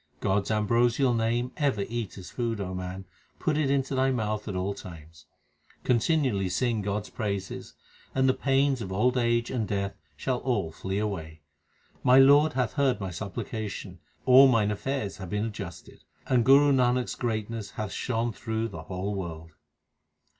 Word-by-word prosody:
God 95 +1 +1
s - - -6
ambrosial 120 +4 +2
name 120 +2 0
ever 130 -9 +1
eat 115 -4 -4
as 95 - -9
food, 115 -2 -2
man; 95 -1 -5 0.3
put 155 -4 0
it 150 -2 +1
into 135 -1 0
thy 130 0 +2
mouth 110 -4 -2
at 100 - -3
all 95 +2 -1
times. 80 -4 -12 0.6
Continually 120 - +2
sing 115 +4 0
God 100 +1 -2
s - - -13
praises, 100 -4 -4 0.4
and 130 0 +3
the 130 - +4
pains 135 -1 +1
of 95 -3 -5
old 125 +7 +2
age 120 -1 +1
and 115 -5 -1
death 100 -1 -2 0.2
shall 130 -2 -1
all 105 -11 -1
flee 95 +4 -4
away. 80 -7 -4 0.6
My 125 +1 +5
Lord 145 +3 +6
hath 125 -4 0
heard 140 -4 +2
my 95 -2 -4
supplication: 100 0 -5 0.3
all 130 +1 +8
mine 110 -5 +3
affairs 110 -1 -3
have 95 -3 -7
been 105 +2 -1
adjusted, 100 -6 -8 0.2
And 125 -2 +3
Guru 140 +2 +6
Nanak 125 -1 +3
s - - -5
greatness 110 -2 -3
hath 105 -2 -3
shone 115 -1 -1
through 110 0 -3
the 80 -6 -8
whole 95 +2 -3
world. 80 -4 -6
110 Hz, 170 wpm, -27 LUFS, 100-125 Hz, 0.6 s, all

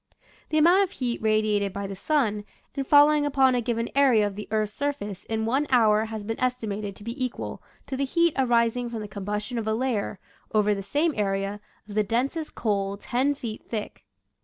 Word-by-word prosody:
The 310 - +1
amount 345 +5 +6
of 390 - 0
heat 245 -3 -2
radiated 215 -2 +1
by 200 0 -4
the 195 0 -5
sun 215 -3 0 0.3
and 275 -1 -3
falling 295 0 +6
upon 270 -3 +3
a 245 - +1
given 230 0 -1
area 260 -6 +4
of 205 -1 -3
the 210 0 -7
earth's 215 -1 0
surface 270 -10 -4
in 220 0 -2
one 270 +6 +1
hour 220 -4 +4
has 220 -1 -6
been 225 +2 -4
estimated 215 -5 -2
to 205 - -12
be 235 +4 -4
equal 250 -1 -4 0.2
to 270 - -4
the 275 - -1
heat 335 +4 +2
arising 240 -2 +2
from 230 -2 -5
the 210 - -6
combustion 210 +4 -4
of 220 - -4
a 220 - +1
layer, 230 -5 -1 0.4
over 210 0 +4
the 200 - -3
same 295 - 0
area, 195 0 -1 0.3
of 210 - -9
the 215 - +3
densest 265 - -2
coal 200 -3 -1
ten 260 +6 0
feet 230 -5 -6
thick. 215 -3 -5
225 Hz, 200 wpm, -26 LUFS, 210-265 Hz, 0.4 s, amount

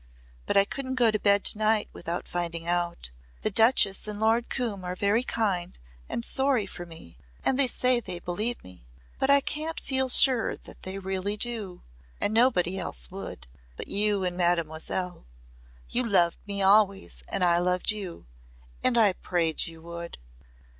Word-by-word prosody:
But - - +1
I 200 - +6
couldn't 260 +3 -5
go 240 -3 +3
to 215 - -1
bed 200 0 +3
to 210 - +4
night 215 0 +2
without 170 +1 -5
finding 170 -1 -4
out. 175 - -2 0.3
The 215 - +1
Duchess 220 -2 +4
and 210 -1 -4
Lord 225 +2 +1
Coombe 220 -7 -3
are 180 0 -4
very 205 +4 +1
kind 200 -8 -2 0.3
and 235 - 0
sorry 265 -5 +2
for 175 -2 -9
me 85 - -13 0.3
and 265 - +1
they 275 - +5
say 250 0 +3
they 185 -6 -5
believe 210 +8 -3
me 90 -10 -16 0.3
but 265 - 0
I 280 0 +6
can't 310 +3 -3
feel 265 -1 -1
sure 250 -2 +5
they 190 +1 -9
really 195 +1 -3
do. 210 -6 -3 0.4
And 210 - 0
nobody 195 -6 +2
else - - -1
would. - - -8 0.3
But - - -8
you 205 -1 +2
and 180 -1 -2
Mademoiselle. 175 - -2 0.6
You 250 - 0
loved 175 -4 +3
me 200 -1 -2
always 200 0 +3
and 185 - 0
I 175 -1 +3
loved 180 +2 +1
you. 195 - -7 0.6
And 255 -2 +2
I 210 -4 +5
prayed 170 -3 0
you 165 -1 -12
would." 170 0 -8
195 Hz, 165 wpm, -26 LUFS, 175-230 Hz, 0.6 s, I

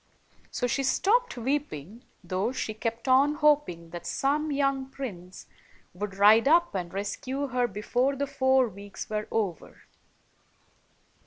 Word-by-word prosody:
So 245 - -2
she 245 +3 0
stopped 415 - +1
weep 280 +5 -1
ing, 180 - -9 0.2
though 185 +6 -1
she 225 -4 -3
kept 230 +3 -4
on 275 +3 +4
hoping 290 - +1
that 175 0 -7
some 295 +3 0
young 275 -1 0
prince 185 -10 -8 0.5
would 195 +1 -5
ride 215 +5 +6
up 340 +3 +4
and 180 -3 -3
rescue 255 +8 -3
her 250 0 +1
before 240 +6 0
the 280 +1 -1
four 260 -1 +2
weeks 200 0 -9
were 210 0 -2
over. 200 -7 -3
245 Hz, 140 wpm, -27 LUFS, 200-275 Hz, 0.5 s, ride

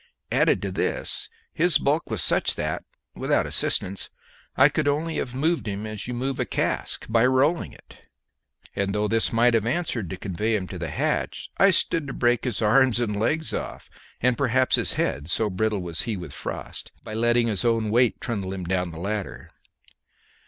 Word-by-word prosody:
Added - - +3
to - - -2
this, - - -2 0.2
his 175 -2 +3
bulk 150 +4 0
was 110 -7 -1
such - - +2
that, - - -2 0.3
without - - +1
assistance, 95 +1 -1 0.5
I 135 - +8
could 150 0 -1
only 155 +3 0
have 125 -1 -3
moved 160 +1 0
him 100 +1 -3
as 110 -1 -5
you 125 - -3
move 130 +2 -2
a - - +1
cask, - - -1
by 115 +1 +3
rolling 140 +6 +2
it; - - -17 0.8
and 100 +1 -1
though 105 0 +1
this 115 +1 +1
might 120 +1 +4
have 115 -1 +2
answered 120 - -1
to 95 - -5
convey 105 +4 -1
him 95 -3 -1
to 90 - -6
the 85 - -3
hatch, - - -2
I 195 - +7
stood 165 -4 +1
to 135 - -5
break 120 0 +1
his 120 -3 -1
arms 125 +2 +4
and 105 -4 -1
legs 160 +8 0
off, - - -5 0.3
and 125 0 +3
perhaps 130 -1 +3
his - - +1
head, 70 +4 -1
so 105 +3 +1
brittle 105 0 0
was 85 -2 -1
he 115 -4 -2
with 85 -6 -8
frost, - - -6
by 110 - -7
letting 120 +1 +3
his 105 -5 -1
own 115 -2 +1
weight 120 +1 +3
trundle 100 -5 -3
him 95 -1 -5
down 90 0 -1
the 80 -1 -9
ladder. 100 +2 -4
115 Hz, 190 wpm, -25 LUFS, 100-130 Hz, 0.8 s, I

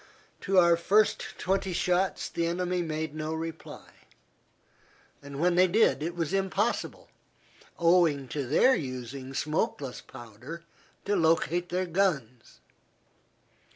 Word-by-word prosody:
To 195 0 0
our 170 -2 +6
first 205 +5 +1
twenty 190 0 -1
shots 180 +2 0
the 170 0 -2
enemy 180 +1 -1
made 160 -2 -3
no 155 +1 -3
reply; 165 0 -7 1.3
when 140 +5 -1
they 180 +1 +5
did 195 -5 +3
it 170 +3 -3
was 165 -2 -2
impossible, 195 +3 -1 0.7
owing 165 -5 +3
to 140 0 -3
their 250 - +4
using 130 - -5
smokeless 145 -3 -2
powder, 125 +7 -10 0.4
to 205 +1 +1
locate 170 +1 +1
their 185 +1 -1
guns. 155 - -2
170 Hz, 115 wpm, -28 LUFS, 145-180 Hz, 1.3 s, our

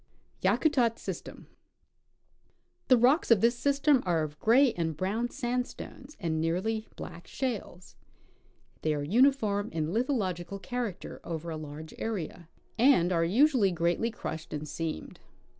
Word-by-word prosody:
Yakutat 250 -7 +2
System. - - -7 1.4
The 255 - +6
rocks 260 +8 +4
of 230 -4 +6
this 235 +1 +4
system 280 +1 +3
are 170 -4 +1
of 150 0 -6
gray 250 +3 +5
and 160 -3 -2
brown 215 +7 -1
sandstones 250 +2 -4
and 160 -3 -1
nearly 205 +7 -1
black 170 0 -9
shales. 220 -8 -4 0.9
They 155 -1 +1
are 145 -1 -3
uniforjoi 220 - +2
in 160 -1 -2
lithological 200 - -1
character 240 -4 -5
over 165 0 -5
a - - -3
large 155 +1 -8
area, 175 -6 -4 0.3
and 230 -9 +5
are 165 -2 +2
usually 230 - +4
greatly 175 +6 +1
crushed 160 -7 -6
and 150 0 -4
seamed. 160 - -5
200 Hz, 130 wpm, -29 LUFS, 165-245 Hz, 1.4 s, The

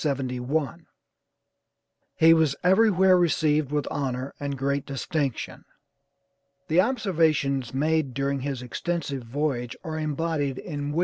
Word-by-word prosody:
He 165 +1 +6
was 160 -4 +2
everywhere 190 -1 +5
received 155 -4 +2
with 145 -2 -1
honor 130 -1 -3
and 140 -1 -3
great 140 +1 -1
distinction. 140 -1 -3 1.1
The 165 +3 +5
observations 160 - +1
made 150 -2 0
during 140 0 -1
this 135 -2 -4
extensive 140 +1 -3
voyage 125 0 -2
are 160 -1 -4
embodied 150 -3 -1
in 145 -4 -4
"Wm. 165 - 0
145 Hz, 110 wpm, -26 LUFS, 135-165 Hz, 1.1 s, He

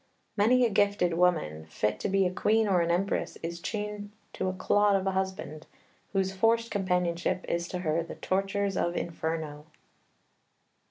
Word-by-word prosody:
Many 245 +4 +4
a - - +2
gifted 200 -3 +2
woman, 160 - +1
fit 105 +6 -1
to - - -2
be 195 0 +3
a 180 - 0
queen 220 +3 +2
or 185 -3 +3
an 170 - 0
empress, 180 +4 0
is 170 +1 -4
chained 210 0 -4 0.2
to 190 - -2
a 185 - -1
clod 205 +2 +3
of 195 -1 0
a 195 - +1
husband, 190 -5 -3 0.4
whose 190 -1 0
forced 230 +4 +2
companionship 180 -3 0
is 170 0 -1
to 180 - -4
her 160 +2 +1
the 165 - -7
tortures 195 +1 -1
of 175 -1 0
Inferno." 160 -3 -4
185 Hz, 165 wpm, -29 LUFS, 170-200 Hz, 0.4 s, Many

